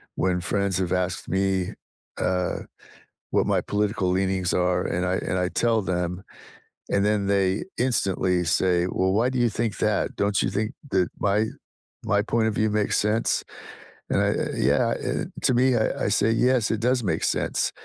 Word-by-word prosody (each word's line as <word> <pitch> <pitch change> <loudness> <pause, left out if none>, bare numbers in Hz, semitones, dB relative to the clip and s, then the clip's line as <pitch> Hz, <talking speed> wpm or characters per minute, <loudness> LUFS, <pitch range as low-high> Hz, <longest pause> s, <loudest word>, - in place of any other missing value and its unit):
when 90 -1 +1
friends 100 +1 -1
have 95 -1 -1
asked 90 -1 -2
me, 95 -1 0 0.4
uh, 90 -1 0 0.7
what - - +2
my - - +1
political 105 -1 -1
leanings 95 -1 0
are, 90 0 +1
and 90 +1 -1
I 90 +1 0
and 95 - 0
I 90 0 0
tell 115 -1 +1
them, 90 0 -2 0.7
and 100 0 +2
then 105 -1 +1
they 100 0 +1
instantly 95 -7 +1
say, 85 +2 +2
“Well, 95 0 0
why 115 +5 +2
do 130 -1 -2
you 120 -1 +3
think 110 0 -2
that? - - 0
Don't 100 -1 +1
you - - +1
think 105 +2 -2 0.2
that 95 -2 +2
my 105 +2 +2 0.6
my 100 0 +2
point 115 +1 0
of 110 - -2
view 110 +1 +1
makes 105 -1 +1
sense?” 105 +2 +1 0.7
And - - +2
I - - +2 0.2
Yeah, - - +2 0.5
to - - +2
me, 125 +2 +3
I 110 - 0
I - - +2
say, 105 +2 +2
“Yes, 125 0 +2
it 110 - -1
does 125 0 +1
make 85 -6 -1
sense, - - 0
100 Hz, 175 wpm, -25 LUFS, 90-110 Hz, 0.7 s, you